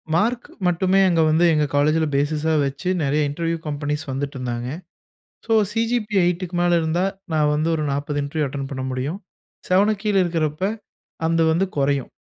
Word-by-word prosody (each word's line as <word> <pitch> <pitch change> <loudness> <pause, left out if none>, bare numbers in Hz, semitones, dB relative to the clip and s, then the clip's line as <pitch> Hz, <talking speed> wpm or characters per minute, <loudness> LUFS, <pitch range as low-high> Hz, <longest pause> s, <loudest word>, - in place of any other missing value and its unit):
Mark 235 +6 0 0.2
மட்டுமே 185 +2 +2
அங்க 165 -2 +3
வந்து 160 +3 +4
எங்க 150 -1 +2
காலேஜில 155 +3 +3
பேஸிஸா 155 +2 +1
வச்சு 140 +6 -3
நிறைய 145 +2 +1
இன்டர்வியூ 165 +3 -2
கம்பெனிஸ் 150 0 -2
வந்துட்டிருந்தாங்க. 125 -3 -4 0.8
ஸோ 225 - +1 0.2
சி.ஜி.பி.எ 225 -2 0
8க்கு 180 0 -2
மேல 175 0 +3
இருந்தா 165 +3 0 0.3
நான் 150 -1 +3
வந்து 155 +2 0
ஒரு 155 - -2
40 145 +1 -2
இன்டர்வியூ 150 +2 -1
அட்டெண்ட் 135 0 -5
பண்ண 130 -1 -4
முடியும். 130 +7 -3 0.5
7க்கு 200 +2 +3
கீழே 205 -2 +3
இருக்கிறப்போ 165 +1 -1 0.6
அது 165 0 +2
வந்து 185 +4 +1
குறையும் 140 -1 0
160 Hz, 150 wpm, -22 LUFS, 145-180 Hz, 0.8 s, வந்து